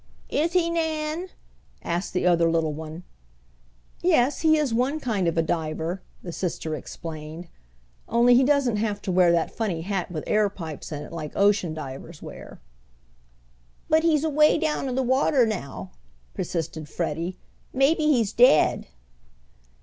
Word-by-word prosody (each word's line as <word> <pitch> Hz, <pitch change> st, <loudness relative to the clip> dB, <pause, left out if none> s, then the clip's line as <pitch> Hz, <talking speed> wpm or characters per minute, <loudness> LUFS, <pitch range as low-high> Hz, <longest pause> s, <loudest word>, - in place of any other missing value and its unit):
"Is 330 Hz, +3 st, +1 dB
he, 340 Hz, -2 st, +2 dB
Nan?" 320 Hz, +1 st, -2 dB, 0.6 s
asked 175 Hz, +2 st, -2 dB
the 180 Hz, -, 0 dB
other 170 Hz, -2 st, +4 dB
little 165 Hz, -2 st, +1 dB
one. 160 Hz, +3 st, -8 dB, 1.0 s
"Yes, 295 Hz, -6 st, +2 dB
he 315 Hz, -1 st, +4 dB
is 290 Hz, -6 st, 0 dB
one 260 Hz, +6 st, +1 dB
kind 210 Hz, -, -1 dB
of 165 Hz, -, -1 dB
a 165 Hz, -, +3 dB
diver," 160 Hz, +2 st, -2 dB, 0.2 s
the 175 Hz, -, -6 dB
sister 165 Hz, -2 st, -3 dB
explained, 155 Hz, +2 st, -7 dB, 0.6 s
"only 240 Hz, +1 st, +5 dB
he 250 Hz, +2 st, +6 dB
doesn't 265 Hz, -5 st, +2 dB
have 210 Hz, -1 st, -1 dB
to 195 Hz, -, -2 dB
wear 180 Hz, -1 st, +5 dB
that 170 Hz, -1 st, +1 dB
funny 195 Hz, -8 st, -2 dB
hat 190 Hz, 0 st, -3 dB
with 155 Hz, -3 st, -4 dB
air 210 Hz, -1 st, +2 dB
pipes 165 Hz, -5 st, -8 dB
in 150 Hz, -1 st, -5 dB
it -, -, -11 dB
like 155 Hz, -3 st, -6 dB
ocean 200 Hz, -5 st, +2 dB
divers 150 Hz, +2 st, -8 dB
wear." -, -, -10 dB, 1.3 s
"But 315 Hz, +1 st, +4 dB
he's 315 Hz, -3 st, +2 dB
away 305 Hz, -1 st, +4 dB
down 300 Hz, -4 st, -1 dB
in 250 Hz, -, -3 dB
the 265 Hz, -, +1 dB
water 260 Hz, 0 st, +3 dB
now," 185 Hz, -11 st, -5 dB, 0.4 s
persisted 160 Hz, -2 st, -4 dB
Freddie. 170 Hz, +2 st, -3 dB, 0.3 s
"Maybe 290 Hz, +4 st, +2 dB
he's 245 Hz, -9 st, +2 dB
dead." 240 Hz, -10 st, +4 dB
200 Hz, 150 wpm, -25 LUFS, 165-275 Hz, 1.3 s, he